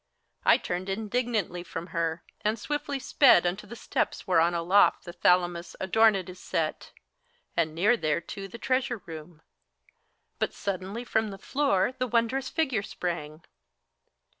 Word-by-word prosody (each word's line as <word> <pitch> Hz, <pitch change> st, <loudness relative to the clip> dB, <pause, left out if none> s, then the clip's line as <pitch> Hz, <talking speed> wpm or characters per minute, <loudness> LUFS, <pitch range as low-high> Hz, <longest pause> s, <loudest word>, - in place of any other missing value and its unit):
I -, -, +6 dB
turned 180 Hz, +2 st, -4 dB
indignantly 215 Hz, -2 st, -1 dB
from 170 Hz, -1 st, -6 dB
her, 165 Hz, -1 st, -1 dB, 0.2 s
and 215 Hz, +2 st, +1 dB
swiftly 290 Hz, +3 st, -3 dB
sped 260 Hz, -8 st, +5 dB
Unto 190 Hz, +4 st, -2 dB
the 235 Hz, -, -8 dB
steps -, -, -2 dB
whereon 175 Hz, -2 st, +3 dB
aloft 180 Hz, +4 st, +3 dB
the 175 Hz, -, -7 dB
Thalamos 175 Hz, 0 st, +2 dB
Adorned 195 Hz, -1 st, +3 dB
is 185 Hz, 0 st, -10 dB
set, 165 Hz, -4 st, -2 dB, 0.6 s
and 160 Hz, -2 st, 0 dB
near 205 Hz, +8 st, +4 dB
thereto 170 Hz, +2 st, -2 dB
the 195 Hz, -, -9 dB
treasure 255 Hz, 0 st, 0 dB
room: 160 Hz, 0 st, -10 dB, 1.0 s
But -, -, -1 dB
suddenly 200 Hz, +4 st, -4 dB
from 220 Hz, -2 st, 0 dB
the 195 Hz, -, -7 dB
floor 255 Hz, -4 st, +1 dB
the 255 Hz, -, 0 dB
wondrous 240 Hz, +3 st, 0 dB
figure 270 Hz, -10 st, 0 dB
sprang. 165 Hz, -5 st, -5 dB
195 Hz, 140 wpm, -28 LUFS, 170-230 Hz, 1.0 s, I